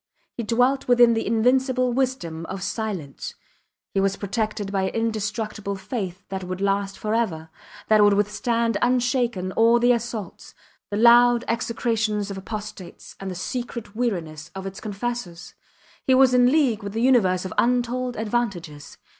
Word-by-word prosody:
He - - -3
dwelt 245 +4 +1
within 240 -1 +6
the 225 - -1
invincible 250 +2 +2
wisdom 180 -12 -2
of 195 0 -5
silence; 195 - -4 0.6
he 195 - +1
was 195 0 +1
protected 205 0 -3
by 190 -1 0
an - - -11
indestructible 215 -2 -2
faith 190 -2 -5
that 190 -1 -4
would 185 +1 -5
last 195 0 0
forever, 210 -8 -2 0.4
that 215 -1 +5
would 205 0 +5
withstand 230 +2 0
unshaken 245 -6 +1
all 230 +3 +4
the 240 +1 +4
assaults 230 -5 -4 0.3
the 205 - -2
loud 240 +1 +6
execrations 225 -3 -1
of 195 - -6
apostates, 210 -2 -8
and 195 - -5
the 185 - -5
secret 235 +2 -5
weariness 170 -10 -3
of 190 0 -6
its 195 +1 -7
confessors! 205 -5 -5 0.5
He 260 - +5
was 260 -1 +5
in 250 0 +5
league 265 -8 +2
with 200 +1 -7
a - - 0
universe 195 -8 +3
of 185 - -5
untold 245 +1 0
advantages. 200 -10 -3
220 Hz, 150 wpm, -24 LUFS, 195-240 Hz, 0.6 s, within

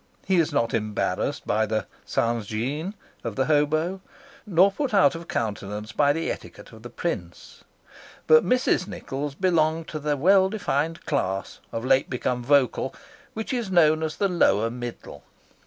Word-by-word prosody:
He 190 -1 +2
is 165 -3 +2
not 115 -5 0
embarrassed 110 -2 -1
by 110 +1 +1
the 110 0 -1 1.4
of 115 -3 -4
the 130 - +1
hobo, 155 +5 +1 0.5
nor 190 +1 +5
put 255 +1 -2
out 185 -2 +5
of 165 0 -8
countenance 105 -1 -3
by 145 +5 +3
the 165 +3 -1
etiquette - - -9
of - - -13
the - - -9
prince. - - -5 0.6
But 470 0 +6
Mrs. 250 -7 +1
Nichols 140 -6 -5
belonged 165 -2 +1
to 155 - -4
the 150 0 -1
well 190 +5 +5
defined 165 -6 -2
class, 95 -10 -2
of 115 +2 -4
late 135 0 +3
become 125 -1 -2
vocal, 140 -1 +2 0.4
which 220 +3 -4
is 240 -5 -2
known 160 -4 +4
as 160 -1 -2
the 200 - +1
lower 115 - +2
middle. 120 -1 -8
150 Hz, 155 wpm, -25 LUFS, 120-185 Hz, 1.4 s, But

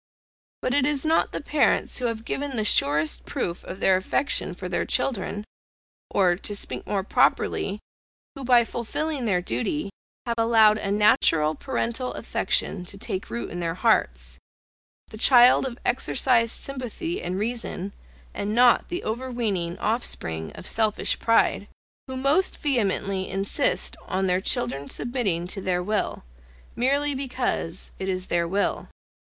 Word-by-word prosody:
But 255 - 0
it 285 -1 +3
is 295 -1 0
not 320 +1 +2
the - - -4
parents 290 -1 +1
who 250 - -2
have 225 -1 -4
given 280 0 -3
the 215 -2 0
surest 150 -4 +4
proof 170 0 -4
of 185 - -8
their 190 -1 +4
affection 190 +9 0
for - - -6
their - - -1
children, 205 -4 -1 0.6
(or, 180 -3 +3
to 205 +1 -4
speak - - -6
more 195 -2 -1
properly, 200 0 +1 0.5
who 275 - -9
by 245 -1 +5
fulfilling 255 +5 -3
their 180 -5 +1
duty, 150 - -2 0.3
have 235 -1 -2
allowed 220 -2 +5
a 200 - -3
natural 165 -7 +3
parental 250 - -3
affection 180 - -1
to 195 - -6
take 190 -1 -4
root 235 - -5
in 175 - -5
their 165 -1 -2
hearts, - - +1 0.7
the 215 - -10
child 250 +2 +6
of 240 -2 -7
exercised 245 -2 +2
sympathy 275 - -4
and 180 +1 -3
reason, 205 -3 -3 0.4
and 205 +2 -3
not 245 0 +5
the 350 +1 -4
over 245 +4 -3
weening 195 -8 -2
offspring 80 - -2
of - - -11
selfish 215 0 0
pride,) 230 0 +2 0.4
who 260 0 -5
most 280 +8 +1
vehemently 200 -8 0
insist 195 - 0
on 190 +1 -1
their 185 0 +1
children 140 -3 0
submitting 230 -9 -1
to 195 +2 -4
their 180 -1 0
will, 210 - -2 0.5
merely 280 +4 +1
because 255 -10 -3
it 190 - -3
is 185 -1 -2
their 170 -1 0
will. 200 +4 -1
215 Hz, 150 wpm, -25 LUFS, 185-250 Hz, 0.7 s, child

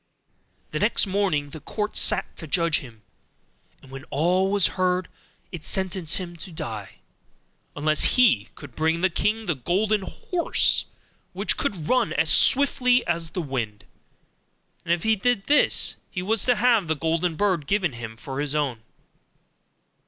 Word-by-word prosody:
The - - -2
next - - +2
morning 185 -8 -1
the 155 - -8
court 210 +8 -4
sat - - +2
to 160 - -8
judge 170 +1 +2
him; 115 -5 -13 0.8
and 135 - -16
when 135 0 -8
all 180 +6 +1
was 200 -3 +3
heard, 185 0 0 0.4
it 165 -3 -7
sentenced 190 -4 -2
him 175 -2 -6
to 180 +3 -8
die, 110 -10 -5 0.8
unless 155 +1 +1
he 225 - +4
should 140 -4 -11
bring 160 +1 0
the 190 -1 +2
king 220 +5 -1
the 175 - 0
golden 195 - 0
horse 340 - 0 0.5
which - - 0
could 195 - -3
run 255 - +2
as - - +3
swiftly 250 -2 +3
as 170 -1 -2
the 180 +2 -4
wind; 115 -7 -4 1.0
and - - -3
if 170 -1 +1
he 220 0 +3
did 230 -1 0
this, 295 +1 +4
he 180 - -5
was 215 +2 +1
to 245 - +3
have 230 -4 +3
the 160 - 0
golden 165 +2 -1
bird 180 -6 0
given 190 -8 0
him 115 -1 -8
for 135 +1 -6
his 145 0 -1
own. 140 -6 -1
175 Hz, 160 wpm, -24 LUFS, 150-205 Hz, 1.0 s, he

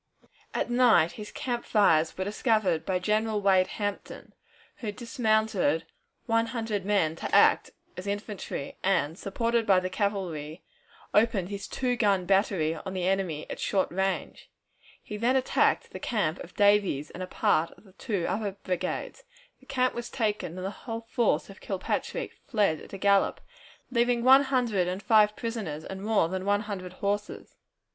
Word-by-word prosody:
At - - -1
night 240 -9 +5
his 210 -1 -9
camp 240 -2 -3
fires 165 -7 +3
were 190 - -1
discovered 205 -5 0
by 185 - +1
General 215 +3 0
Wade 190 -2 +4
Hampton, 205 -1 -5 0.4
who 215 -3 -4
dismounted 220 - 0 0.4
one 230 0 +2
hundred 225 -5 -3
men 195 -6 +1
to - - -2
act - - +5 0.3
as 185 +2 -7
infantry, 205 -7 -5
and, 165 -5 +1
supported 230 +4 -1
by 190 -2 +6
the 185 0 -4
cavalry, 180 -6 -3 0.5
opened 210 -4 +2
his 200 -1 -5
two 250 -1 -1
gun 200 -6 +2
battery 190 -4 +2
upon 190 +4 -7
the 180 -1 -1
enemy 185 -6 -1
at - - -7
short 195 -2 0
range. 190 +2 -2 0.5
He 210 - -6
then 240 +4 +2
attacked 260 -1 +2
the - - -7
camp 190 -8 -1
of 175 - -10
Davies's 200 -8 +3
and 185 - -8
of 185 - -5
a - - -30
part 160 +2 +2
of 195 -3 -20
two 200 -8 -2
other 205 -1 -2
brigades. 185 -2 -4 0.4
The 265 - -22
camp 255 -2 +1
was 240 0 -5
taken, 210 -7 -2
and 185 - -5
the 195 - -2
whole 225 +1 -6
force 230 0 0
of 195 - -13
Kilpatrick 190 -2 -3 0.2
fled 205 - +1
at - - -13
a - - -4
gallop, 200 0 +3 0.5
leaving 240 -1 +2
one 265 +2 +7
hundred 240 -9 +1
and 185 +3 -4
five 215 -2 +4
prisoners 215 -10 -4
and 190 0 -7
more 210 -5 +2
than 185 +2 -4
one 205 +1 +2
hundred 190 -4 -6
horses. 200 +2 -3
205 Hz, 165 wpm, -28 LUFS, 185-225 Hz, 0.5 s, one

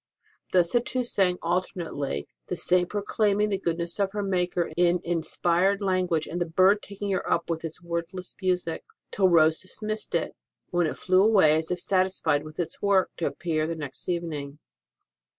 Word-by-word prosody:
Thus 175 -2 +3
the 240 - +3
two 255 +1 -2
sang 190 -6 +1
alternately 165 - -2 0.2
the - - -2
Saint 180 -1 +2
proclaiming 210 0 +1
the 195 -2 -1
goodness 170 0 -2
of 195 -1 0
her 205 -1 -2
Maker 180 -2 0
in 175 0 +3
inspired 175 +3 +1
language 185 -5 0
and 175 +2 -4
the 175 - 0
bird 185 +5 +4
taking 200 0 -5
her 190 - -1
up 170 0 0
with 160 0 -3
its 165 +2 -7
wordless 170 +2 -4
music, 180 -3 -1 0.3
till 190 -2 +3
Rose 160 -2 +5
dismissed 215 +3 -4
it, - - -1 0.4
when 175 -2 +2
it - - -4
flew 185 0 +3
away 195 -8 +5
as 160 0 -1
if 180 - -1
satisfied 185 -6 +1
with 155 +1 -11
its 175 - -3
work, 195 -2 +3
to 165 - 0
appear 155 -2 -1
the 165 - -3
next 150 0 -7
evening. 155 -5 -3
180 Hz, 175 wpm, -26 LUFS, 165-195 Hz, 0.4 s, Rose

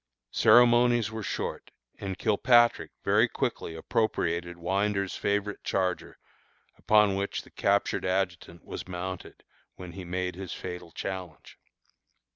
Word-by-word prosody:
Ceremonies 120 -2 +5
were 110 0 -5
short, - - -4 0.3
and 95 -2 -4
Kilpatrick 120 +3 +3
very - - +4
quickly 80 - -3
appropriated 85 -2 -1
Winder's 100 +2 -1
favorite 105 0 -1
charger, 90 -2 -2 0.6
upon 105 -2 +4
which 100 +1 -2
the - - -19
captured - - +1
adjutant 90 -2 -2
was - - -7
mounted 95 0 -6 0.3
when 90 -2 -9
he 95 +2 -8
made 90 +1 -3
his 95 -1 -7
fatal 90 -2 -7
challenge. 90 -7 -7
95 Hz, 115 wpm, -28 LUFS, 90-105 Hz, 0.6 s, Ceremonies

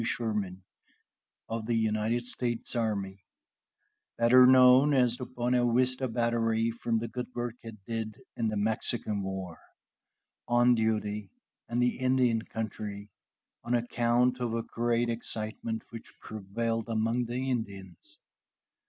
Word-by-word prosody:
Sherman 105 -6 -2 0.8
of 115 -1 -4
the 120 - +1
United 110 +2 0
States 120 -1 -2
Army 100 -4 -2 0.9
(better 125 +2 +7
known 130 +2 +7
as 125 -2 +3
the 125 - -6
Buena 120 -1 +1
Vista 130 +2 +2
Battery, 115 -1 +1
from 115 0 -1
the 115 +1 -2
good 125 +2 -5
work 120 -1 -2
it 115 -1 -9
did 110 -2 -4 0.2
in 115 - -1
the 110 -1 -1
Mexican 110 0 0
war) 95 -3 -5 0.9
on 120 +1 +4
duty 105 -2 -1 0.4
in 120 - -2
the 125 0 +1
Indian 130 -3 +2
country, 105 -2 -6 0.5
on 120 +1 0
account 120 +1 +1
of 120 -2 -1
a 115 - -1
great 120 +1 0
excitement 110 -1 -3
which 115 - -10
prevailed 115 +2 -3
among 115 +2 0
the 125 +3 -2
Indians. 100 -7 -6
115 Hz, 125 wpm, -29 LUFS, 110-120 Hz, 0.9 s, better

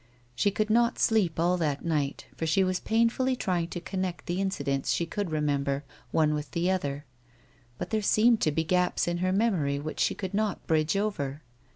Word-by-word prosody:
She 125 +11 +2
could 215 +2 -1
not 235 +1 +3
sleep 200 -8 +2
all 175 +2 +2
that 150 -4 -1
night, 150 -4 -1
for 160 - -3
she 190 +5 +3
was 185 -1 0
painfully 235 +3 +1
trying 180 -8 -1
to 175 - -5
connect 185 0 -4
the 180 +2 -1
incidents 140 -8 -1
she 170 - +1
could 200 +2 -3
remember, 145 -2 0 0.3
one 155 +2 +2
with 150 0 -3
the 175 +2 +1
other; 145 -6 -2 0.7
but - - -5
there 220 -1 +1
seemed 220 +2 +4
to 155 - +2
be 160 +2 0
gaps 180 +2 +1
in 175 0 -1
her 185 +1 +1
memory 185 -9 +1
which 150 +2 -5
she - - +2
could 190 -1 -5
not 210 -1 -1
bridge 155 +3 +1
over. 150 -9 -2
175 Hz, 195 wpm, -28 LUFS, 150-200 Hz, 0.7 s, seemed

